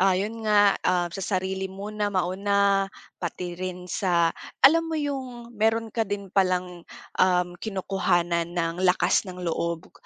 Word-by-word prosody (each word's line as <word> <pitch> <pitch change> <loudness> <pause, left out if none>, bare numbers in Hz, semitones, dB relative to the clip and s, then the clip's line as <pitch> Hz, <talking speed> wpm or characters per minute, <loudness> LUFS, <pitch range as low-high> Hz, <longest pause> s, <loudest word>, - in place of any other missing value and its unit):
ah, 190 -1 +4
'yon 220 +4 -3
nga, 205 -1 +6
um, 175 -2 +1
sa 195 - -5 0.2
sarili 190 +1 -2
muna 205 +2 -3
mauna, 195 +1 +1 0.3
pati 175 0 -4
rin 180 0 -5
sa 175 -3 +1 0.3
alam 330 +3 +6
mo 320 - -2
'yong 260 -5 -4
meron 225 +1 0
ka 225 -3 -1
din 200 -2 -5
palang, 180 -2 +1 0.4
um, 180 -1 +3
kinukuhanan 180 -4 0
ng 165 +1 -1
lakas 185 +2 +2
ng 180 - -7
loob, 170 0 -3
190 Hz, 145 wpm, -25 LUFS, 180-210 Hz, 0.4 s, nga